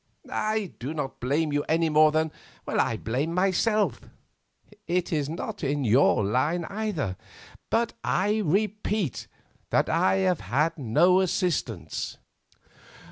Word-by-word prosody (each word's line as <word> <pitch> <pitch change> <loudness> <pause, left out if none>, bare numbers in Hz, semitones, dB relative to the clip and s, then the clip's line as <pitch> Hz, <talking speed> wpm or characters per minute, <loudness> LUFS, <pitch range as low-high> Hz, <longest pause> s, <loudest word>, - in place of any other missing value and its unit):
I 215 -3 -1
do 140 +6 -4
not 140 -3 -4
blame 145 +4 0
you 145 - +2
any 165 +1 +2
more 155 0 +5
than 160 0 0 0.4
I 115 - +1
blame 135 +10 -2
myself—it 180 - -2
is 145 -2 0
not 165 +1 -5
in 140 0 0
your 115 -2 +4
line 150 - 0
either—but 210 - -4
I 205 +4 +1
repeat 205 - -1 0.4
that - - +2
I 95 - +3
have 95 -1 +1
had 145 - 0
no 175 +10 +4
assistance." 150 - -2
155 Hz, 115 wpm, -26 LUFS, 130-185 Hz, 0.4 s, more